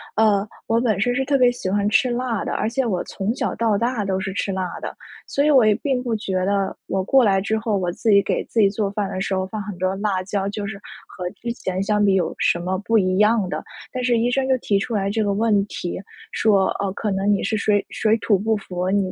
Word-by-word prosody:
呃， 210 -2 +3 0.2
我 225 +1 +2
本 230 -5 +1
身 245 +2 +2
是 265 +2 0
特 275 0 +2
别 250 -1 +5
喜 215 -6 -4
欢 200 +1 +1
吃 250 +4 +3
辣 240 -3 -2
的， - - -2
而 220 - -1
且 255 +2 -1
我 185 -6 -1
从 205 +5 -3
小 - - -1
到 225 -3 +1
大 235 -1 -1
都 190 -1 0
是 190 0 -3
吃 195 -1 -2
辣 185 -1 -3
的。 - - -6 0.3
所 280 - 0
以 300 - +4
我 260 -5 +6
也 215 -1 +4
并 265 -1 -1
不 240 -3 -1
觉 205 -3 -4
得 195 0 0
我 190 0 -1
过 260 +5 +4
来 195 -2 +3
之 220 +3 0
后， 220 -1 -1
我 180 -2 -1
自 220 +6 -2
己 200 -1 +6
给 195 - -1
自 225 - +1
己 200 - +5
做 200 0 -1
饭 200 -1 -2
的 185 - -4
时 190 0 -1
候 190 0 -1
放 215 +2 -5
很 200 -2 -7
多 185 +1 0
辣 195 -2 -1
椒， 195 0 -2
就 205 0 -4
是 200 -1 -6 0.3
和 180 -2 -5
之 235 +3 -5
前 190 -5 -3
相 210 +1 +2
比 195 - +4
有 185 - +1
什 - - +2
么 185 +2 -2
不 225 - +3
一 185 -2 +2
样 210 -2 +3
的。 - - -3 0.3
但 255 - -3
是 245 -1 +2
医 240 +2 +1
生 265 0 +1
就 260 -1 +3
提 200 -3 +1
出 230 - -4
来 195 -1 0
这 220 +2 0
个 205 -1 +1
问 205 -1 +2
题， 180 -3 -5 0.3
说： 200 -3 +3
“呃， 200 - 0
可 210 +1 -2
能 195 +1 0
你 200 - -1
是 215 +2 0
水 205 -1 +1
水 220 0 +2
土 200 -2 +2
不 220 +2 +1
服， 180 -3 -3
你 195 -2 +1
205 Hz, 285 characters per minute, -22 LUFS, 195-230 Hz, 0.3 s, 我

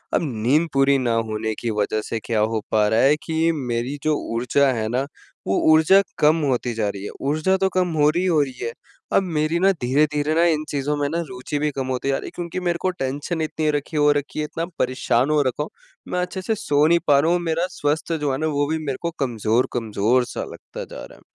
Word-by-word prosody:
अब - - +2 0.2
नींद 150 +7 +3
पूरी 135 0 +4
ना 120 -3 0 0.2
होने 110 0 -2
की 120 - -2
वज़ह 110 +1 0
से 115 - -2
क्या 115 -2 0
हो 110 0 0
पा 105 -1 +3
रहा 110 +2 +2
है 140 +3 +5
कि 160 0 +1
मेरी 130 -2 -3
जो 155 -1 +2 0.2
ऊर्जा 130 +3 +2
है 110 -2 -2
ना, 130 +4 -1 0.4
वो 95 - +2 0.2
ऊर्जा 160 +5 +6 0.2
कम 155 +2 +4
होती 120 -1 -1
जा 110 -2 0
रही 100 -1 -6
है। - - -4
ऊर्जा 155 +7 +1
तो 190 0 +1
कम 180 -3 +1
हो 150 0 +5
रही 175 +4 0
हो 165 -5 +3
रही 130 -3 -6
है, 115 - -3 0.4
अब 195 - +4
मेरी 160 -1 0
ना 195 +2 +5
धीरे-धीरे 150 +4 +1
ना 170 - +4
इन 155 -3 +2
चीज़ों 145 +1 -1
में 145 - 0
ना 165 +3 -1
रुचि 125 +4 -4
भी 150 +1 +1
कम 135 -2 -4
होती 130 +1 -2
जा 135 - +2
रही - - -7
है - - -8
क्योंकि 175 +1 -4
मेरे 175 -1 0
को 185 - +1
टेंशन 145 +2 -3
इतनी 155 0 -1
रखी 145 +1 -3
हो 145 0 +5
रखी 145 +1 -3
है 150 - 0
इतना 165 +2 -4
परेशान 130 +1 +1
हो 150 -1 +3
रखा 130 +3 -1
हूँ 155 - -8 0.4
मैं 180 - 0
अच्छे 180 +1 -4
से 220 +3 -1
सो 145 -5 +2
नहीं 170 +1 +4
पा 140 -1 +6
रहा 160 +4 +2
हूँ 175 - +2
मेरा 165 +1 0
स्वस्थ 150 +3 -1
जो 145 -2 0
है 130 - -1
ना 155 - 0
वो 145 -1 0
भी 160 - +1
मेरे 135 -2 -2
को 170 0 -2
कमज़ोर-कमज़ोर 115 -1 +1
सा - - -5
लगता - - -9
जा - - -9
रहा - - -15
है। - - -21
145 Hz, 245 wpm, -22 LUFS, 125-160 Hz, 0.4 s, ऊर्जा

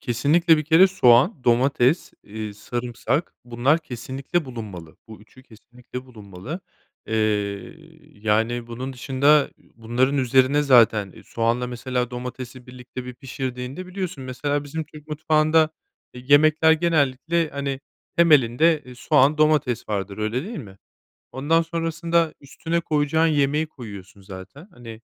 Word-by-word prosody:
Kesinlikle, 155 +7 +3
bir 155 - -2
kere 165 +5 +6
soğan, 135 - +3
domates, 125 +4 +2
eee, 105 0 -7
sarımsak, 120 +7 -3
bunlar 125 +6 +1
kesinlikle 135 +4 -4
bulunmalı, 105 - -9
bu 110 - -12
3'ü 115 +5 -19
kesinlikle 125 +2 -11
bulunmalı. 110 - -9 0.5
Eee, 110 - -3 1.0
yani, 110 +2 -1
bunun 125 +3 -6
dışında, 140 +3 +2
ü - - -27
bunların 120 +5 0
üzerine, 130 +3 +3
zaten, 115 -7 +4
eee, - - -15
soğanla, 115 +2 -1
mesela, 125 0 -3
domatesi 125 0 -8
birlikte 125 0 -9
bir 125 0 -8
pişirdiğinde 130 +4 -6
biliyorsun, 185 -7 -5
mesela, 145 +3 -2
bizim 155 +2 -5
Türk 150 0 -15
mutfağında, 155 +1 +2 0.4
eee, 125 - -10
yemekler 155 +2 +5
genellikle, 160 0 +1
hani, 140 -1 -4 0.4
temelinde, 155 -1 +4
eee, 125 - -12
soğan, 145 +3 +2
domates 150 -6 +1
vardır. 100 -1 -3
Öyle 110 +6 -2
değil 220 +3 -6
mi? 100 -7 -11 0.5
Ondan 160 +5 +1
sonrasında 165 0 -1
üstüne 165 +4 -3
koyacağın 155 0 +1
yemeği 150 0 +1
koyuyorsun 100 -9 -11
zaten. 95 - -11
Hani, 115 -6 -11
130 Hz, 130 wpm, -23 LUFS, 120-155 Hz, 1.0 s, kere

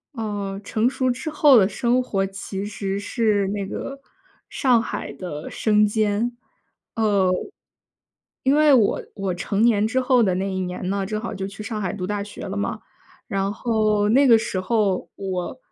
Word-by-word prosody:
嗯， 205 -3 -4
成 220 +4 +1
熟 260 -1 0
之 255 +5 -2
后 295 -3 +6
的 195 -3 +4
生 240 +5 +1
活 195 -5 -1
其 195 0 -6
实 200 -1 -3
是 205 -1 +1
那 200 -1 -2
个 275 +7 -6 0.5
上 245 -4 +3
海 - - -5
的 160 -5 -7
生 210 -1 +3
煎。 215 +3 0 0.6
呃， 205 -5 +2 1.1
因 265 - +3
为 300 -1 +5
我 225 -6 +3
我 195 -2 -2
成 195 +4 -2
年 220 -2 +4
之 260 +3 0
后 255 -1 +3
的 190 -5 +2
那 190 +1 -2
一 190 - -2
年 180 0 -4
呢， 195 0 -1
正 215 +2 -3
好 235 - -4
就 195 -1 -4
去 200 +2 -9
上 215 -1 -4
海 180 - -2
读 185 -3 -4
大 205 +1 -2
学 205 +1 -8
了 200 +1 -4
嘛。 200 - -3 0.5
然 195 0 -1
后 215 -3 +1
那 270 +5 +5
个 230 -2 +8
时 220 -4 -2
候 195 -1 0
我 190 +3 -4
205 Hz, 190 characters per minute, -23 LUFS, 195-230 Hz, 1.1 s, 个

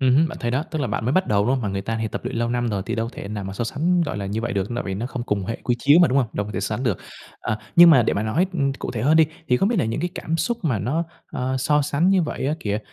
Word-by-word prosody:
Ừm 130 -1 +4
hưm, 160 +2 +4
bạn 160 - -8
thấy 120 - -1
đó, 130 +5 0
tức 155 - -3
là 140 - 0
bạn 115 - -2
mới 125 - +1
bắt 185 +2 +2
đầu, 100 -1 +2
đúng - - +2
hông? 130 - -2
Mà 105 - -1
người 95 0 -2
ta 115 +2 -3
thì 110 - -1
tập 110 - -6
luyện 125 0 -3
lâu 115 0 0
năm 120 0 0
rồi 100 -2 -2
thì - - -2
đâu 115 -1 -2
thể - - -8
nào 105 -1 -4
mà 95 - -5
so 110 +5 -3
sánh, 170 +9 +1
gọi 150 - -3
là, 100 - -4
như 105 +3 -2
vậy 120 +1 -3
được, 100 0 -1
tại 120 - -3
vì 95 - -3
nó 115 +5 -3
không 125 -2 -5
cùng 105 -5 -1
hệ 115 - -3
quy 120 - +1
chiếu 145 +5 +5
mà, 175 - +6
đúng 130 +2 +2
hông? 125 - +2
Đâu 105 - -2
có 105 - -7
thể - - -2
sánh 110 +3 -2
được. 115 -9 0 0.4
À, 110 - -2 0.2
nhưng 170 0 +10
mà 135 -7 +6
để - - +1
mà 100 - -1
nói, 130 +13 +1
ưm, 140 -5 0
cụ 135 - -6
thể - - -4
hơn 150 +5 +4
đi, 160 -1 +6 0.2
thì 125 - +4
không 195 - +2
biết 240 - 0
là - - +2
những 115 +6 -2
cái 175 +2 -1
cảm 165 - -2
xúc 235 +8 -1
mà 130 -9 +1
nó, 145 +11 -1 0.3
ờ, 130 +1 -1
so 150 +3 +2
sánh 150 +6 +1
như 190 -2 +4
vậy 150 - -3
á 150 - +1
kìa, 105 0 -1
125 Hz, 360 wpm, -23 LUFS, 110-155 Hz, 0.4 s, nhưng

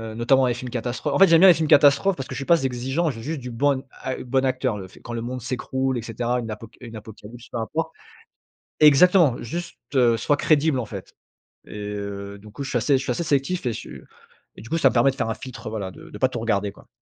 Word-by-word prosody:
notamment, 130 +3 +3
les 120 - +1
films 125 +1 -7
catastrophes. 125 +4 -3
En - - +1
fait, 195 - +8
j'aime 165 -1 +6
bien 190 - +8
les - - +9
films 160 -1 -1
catastrophes, 145 +7 +5
parce 135 - -6
que - - -5
je - - -4
suis 135 - -5
pas 170 - +5
z 135 - -3
exigeant, 135 +6 -1
j'ai 115 -3 -9
juste 155 0 -3
du 125 - -6
bon 135 +2 +1 0.2
ac 130 0 -4
bon 130 +1 0
acteur, 130 -3 0
le 95 -2 -8
fait - - -18
quand 120 - -8
le 115 - -3
monde 125 +2 -5
s'écroule 130 +1 -2
et 120 - -3
cetera, 120 +2 -2
une 115 -2 -5
apoca 110 +1 -10
une 115 -2 -9
apocalypse, 110 +2 -11
peu - - -5
importe. 160 +8 -3 0.9
Exactement, 155 -1 +6
juste, 170 +9 -6 0.2
heu, 120 -3 +4
soit 145 +5 +1
crédible, 150 -3 +2
en 115 - -3
fait. 100 -3 -9 0.5
Et, - - -14
heu, 100 -1 -6
du 105 +2 -14
coup 140 +7 -7
je 135 - -5
suis 125 - +1
assez 135 +4 +2
je - - -5
suis - - -3
assez 175 - -1
sélectif 145 +1 0
et 120 - +1
je - - -5
suis 65 +1 -10 0.6
et - - -11
du 115 - -11
coup, 165 - 0
ça 140 - +5
me - - -4
permet 125 +3 +4
de - - -15
faire 120 - -1
un 110 - -1
filtre 130 -5 -9
voilà 100 -4 -4
de - - -13
de 105 - -9
pas 130 - +3
tout 120 - -4
regarder 100 -3 0
quoi. - - -19
125 Hz, 270 wpm, -23 LUFS, 115-140 Hz, 0.9 s, les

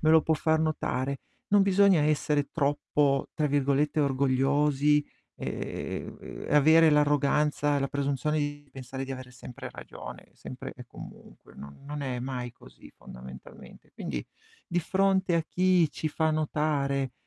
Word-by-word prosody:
me 155 - +3
lo 160 0 +7
può 160 - +2
far 160 +1 +1
notare; 140 -3 -1 0.3
non 205 -1 +5
bisogna 195 -4 +4
essere 150 -1 +1
troppo, 145 -2 +1
tra 150 - +1
virgolette, 145 +2 +1
"orgogliosi", 140 +2 +2 0.3
ehm, - - -6
e - - +2
avere 160 +2 +6
l'arroganza, 145 0 +2
la 135 0 -1
presunzione 140 +1 -1
di 145 0 -4
pensare 130 0 -6
di 135 - -5
avere 130 -1 -8
sempre 125 0 -9
ragione, - - -10
sempre - - -8
e - - -10
comunque, - - -13
non 70 - -11
non 145 0 -5
è 130 -2 -3
mai 125 -2 -4
così - - -16
fondamentalmente. 65 +1 -12
Quindi, - - -4 0.4
di 175 0 0
fronte 190 0 +2
a 165 - +2
chi 180 -3 +3
ci 155 +3 -3
fa 160 +1 0
notare, 145 -4 0
145 Hz, 145 wpm, -28 LUFS, 135-155 Hz, 0.4 s, lo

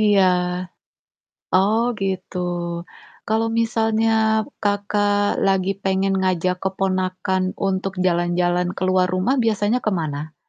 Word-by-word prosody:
Iya. 205 -3 +4 1.3
Oh, 205 +5 +3 0.2
gitu. 190 -1 -3 0.9
Kalau 220 +1 +1
misalnya, 225 -1 +1 0.5
Kakak, 205 0 +1
lagi 195 -1 +2
pengen 195 0 +1
ngajak 185 -1 0
keponakan 185 -1 -1 0.3
untuk 190 0 -2
jalan-jalan 175 0 +1
keluar 185 0 +2
rumah 190 +9 +1
biasanya 215 +2 +1
ke - - +3
mana? 150 0 -5
190 Hz, 95 wpm, -21 LUFS, 185-205 Hz, 1.3 s, Iya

